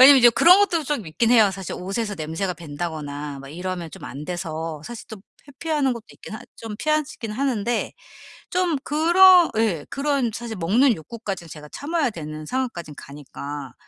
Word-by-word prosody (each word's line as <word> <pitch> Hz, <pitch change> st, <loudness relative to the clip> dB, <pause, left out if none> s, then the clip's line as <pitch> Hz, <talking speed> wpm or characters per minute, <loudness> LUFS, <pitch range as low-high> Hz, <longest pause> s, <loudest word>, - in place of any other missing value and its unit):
왜냐하면 270 Hz, +1 st, +10 dB
이제 240 Hz, -1 st, +8 dB
그런 355 Hz, -, +7 dB
것도 355 Hz, -5 st, +2 dB
좀 260 Hz, -, -2 dB
있긴 225 Hz, +9 st, +1 dB
해요. 220 Hz, -5 st, +6 dB
사실 190 Hz, -2 st, -6 dB
옷에서 205 Hz, +3 st, -3 dB
냄새가 165 Hz, +4 st, -3 dB
밴다거나 150 Hz, -3 st, -5 dB
막 135 Hz, -, -10 dB
이러면 175 Hz, +1 st, -5 dB
좀 -, -, -10 dB
안 140 Hz, +3 st, -7 dB
돼서 165 Hz, -3 st, -4 dB
사실 240 Hz, -2 st, -8 dB
좀 220 Hz, -3 st, -9 dB, 0.3 s
회피하는 285 Hz, -1 st, 0 dB
것도 235 Hz, -2 st, -7 dB
있긴 -, -, -10 dB
하 -, -, -7 dB, 0.2 s
좀 225 Hz, -2 st, -7 dB
피하지 305 Hz, +3 st, -1 dB
긴 225 Hz, -2 st, -4 dB
하는데 240 Hz, -2 st, -1 dB, 0.6 s
좀 360 Hz, -4 st, +1 dB
그런 345 Hz, +4 st, +6 dB
예 195 Hz, -10 st, +1 dB
그런 275 Hz, -4 st, 0 dB
사실 235 Hz, 0 st, -5 dB
먹는 225 Hz, +9 st, +3 dB
욕구까지 190 Hz, +1 st, -6 dB
제가 150 Hz, -1 st, -10 dB
참아야 295 Hz, -, -1 dB
되는 155 Hz, -4 st, -7 dB
상황까진 205 Hz, -, -3 dB
가니까 140 Hz, -1 st, -8 dB
215 Hz, 360 characters per minute, -23 LUFS, -, 0.6 s, 왜냐하면